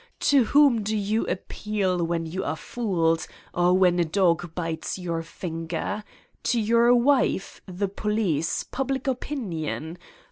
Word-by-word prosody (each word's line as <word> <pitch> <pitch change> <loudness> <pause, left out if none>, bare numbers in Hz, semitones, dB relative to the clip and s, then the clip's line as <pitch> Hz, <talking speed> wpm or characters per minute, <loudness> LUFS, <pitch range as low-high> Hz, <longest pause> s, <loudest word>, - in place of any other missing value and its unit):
To 275 -4 +4
whom 280 -2 +5
do 215 +1 -1
you 210 +2 0
appeal 190 -2 -1
when 165 0 -1
you 185 +4 -4
are - - -2
fooled 165 -6 0 0.3
or 175 +1 +3
when 180 -2 +4
a - - +4
dog 170 -1 +1
bites 165 -1 -3
your 170 -3 -3
finger? 165 +4 -4 0.4
To 240 - +2
your 235 +2 +4
wife, 250 -5 +2
the 190 +2 -2
police, 195 -6 -1
public 265 0 -3
opinion 180 - -3
190 Hz, 135 wpm, -25 LUFS, 165-230 Hz, 0.4 s, whom